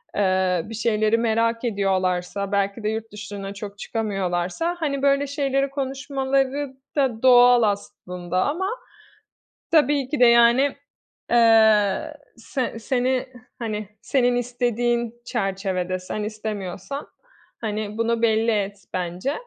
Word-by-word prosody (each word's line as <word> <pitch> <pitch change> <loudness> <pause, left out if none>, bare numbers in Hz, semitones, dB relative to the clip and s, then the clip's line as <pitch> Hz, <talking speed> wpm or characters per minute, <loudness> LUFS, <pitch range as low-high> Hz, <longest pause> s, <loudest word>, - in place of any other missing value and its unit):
eee, 185 -3 +2
bir 225 - -9
şeyleri 215 0 +2
merak 230 0 +1
ediyorlarsa, 195 -2 -1
belki 200 +2 -1
de 210 - +1
yurt 220 +1 -4
dışına 200 -1 -7
çok 205 0 -8
çıkamıyorlarsa, 195 - -2
hani, 280 -4 -1
böyle 280 0 +2
şeyleri 275 -1 0
konuşmaları 270 0 -1 0.3
da 255 -6 +1
doğal 245 -1 +7
aslında 180 -3 -2
ama 345 +7 -1 1.0
tabii 290 -4 +3
ki 295 - -2
de, 250 - +7
yani, 235 +4 +5 0.6
eee, 225 +3 +4 0.2
se 235 0 -4
seni, 255 +2 0 0.3
hani, 215 -3 -4
senin 245 -2 +2
istediğin 240 -1 -1
çerçevede 190 -5 -2
sen 185 +3 -5
istemiyorsan, 210 +3 -5 0.5
hani, 215 -1 -3
bunu 230 0 0
belli 225 0 +3
et 205 -1 -1 0.2
bence. 180 +8 -2
225 Hz, 115 wpm, -23 LUFS, 200-260 Hz, 1.0 s, doğal